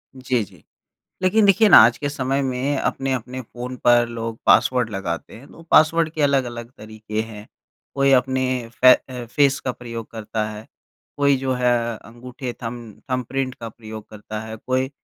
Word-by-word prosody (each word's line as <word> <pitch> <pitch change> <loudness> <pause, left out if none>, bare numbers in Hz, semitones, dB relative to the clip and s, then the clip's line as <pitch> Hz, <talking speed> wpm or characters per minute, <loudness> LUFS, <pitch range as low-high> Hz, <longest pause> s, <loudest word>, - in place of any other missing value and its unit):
जी, 130 -3 -1
जी। 100 - -16 0.6
लेकिन 205 +3 +3
देखिए 200 +2 +5
ना, - - +10
आज 115 +2 +7
के 145 - -3
समय 135 -1 -1
में 135 +2 -1
अपने-अपने 130 -2 -2
फ़ोन 125 +1 -8
पर 120 -1 +5
लोग 115 -1 -5
पासवर्ड 125 -3 +4
लगाते 95 -5 -5
हैं, 130 +5 -14
तो - - -14
पासवर्ड 160 +1 +5
के 155 - -3
अलग-अलग 125 -4 0
तरीके 110 0 -5
हैं। 110 -1 -10 0.5
कोई 140 0 +3
अपने 130 0 +2 0.4
फै 130 0 +9
अ, 125 -2 -6
फ़ेस 140 +3 +2
का 130 - -3
प्रयोग 115 -2 -8
करता 110 -1 -3
है, 105 +1 -9 0.5
कोई 140 -1 +3
जो 130 0 -1
है 125 -1 +1 0.3
अंगूठे 125 +3 -8
थंब 115 -2 -7
थंबप्रिंट 130 +1 -2
का 115 - -7
प्रयोग 110 -1 -10
करता 110 0 -7
है, 110 0 -7
कोई 130 +3 -1
125 Hz, 170 wpm, -22 LUFS, 115-135 Hz, 0.6 s, ना